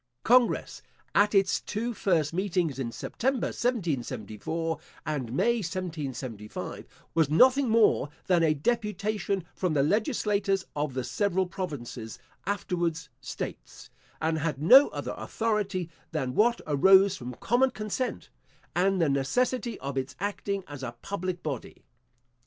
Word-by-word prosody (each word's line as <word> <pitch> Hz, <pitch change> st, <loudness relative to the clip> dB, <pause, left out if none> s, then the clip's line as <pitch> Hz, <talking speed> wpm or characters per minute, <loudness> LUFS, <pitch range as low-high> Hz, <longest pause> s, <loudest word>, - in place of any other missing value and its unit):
Congress, 245 Hz, 0 st, +3 dB, 0.3 s
at 205 Hz, +1 st, +4 dB
its 195 Hz, -1 st, +3 dB
two 230 Hz, +3 st, -3 dB
first 165 Hz, -8 st, +1 dB
meetings, 175 Hz, -6 st, 0 dB
in 120 Hz, -3 st, -2 dB
September 260 Hz, -, -1 dB
1774, 160 Hz, -, -2 dB, 0.3 s
and 135 Hz, -7 st, -3 dB
May 235 Hz, -, +2 dB
1775, 145 Hz, -, -5 dB, 0.3 s
was 160 Hz, -3 st, +3 dB
nothing 255 Hz, -, +5 dB
more 220 Hz, -, +4 dB, 0.2 s
than 180 Hz, -3 st, +3 dB
a 155 Hz, -2 st, +3 dB
deputation 205 Hz, 0 st, -1 dB
from 180 Hz, -5 st, -1 dB
the 140 Hz, -, +4 dB
legislatures 205 Hz, -, +1 dB
of 145 Hz, -3 st, -2 dB
the 130 Hz, -, -1 dB
several 190 Hz, -, 0 dB
provinces, 140 Hz, -, -6 dB, 0.3 s
afterwards 175 Hz, -5 st, -1 dB
states; 135 Hz, -, -7 dB, 0.3 s
and 160 Hz, 0 st, 0 dB
had 150 Hz, -3 st, -2 dB
no 260 Hz, -, +8 dB
other -, -, -5 dB
authority 210 Hz, -5 st, -1 dB, 0.2 s
than 135 Hz, -6 st, -2 dB
what 235 Hz, -, +3 dB
arose 190 Hz, +6 st, +5 dB
from 125 Hz, -1 st, -7 dB
common 245 Hz, -, +2 dB
consent, 215 Hz, +2 st, -4 dB, 0.4 s
and 190 Hz, +2 st, +2 dB
the 165 Hz, -, +3 dB
necessity 235 Hz, -, 0 dB
of 135 Hz, 0 st, -4 dB
its 130 Hz, +1 st, -5 dB
acting 200 Hz, 0 st, -2 dB
as 145 Hz, -2 st, -8 dB
a 120 Hz, -2 st, -5 dB
public 185 Hz, -3 st, -3 dB
body. 140 Hz, -6 st, -5 dB
180 Hz, 130 wpm, -28 LUFS, 145-210 Hz, 0.4 s, no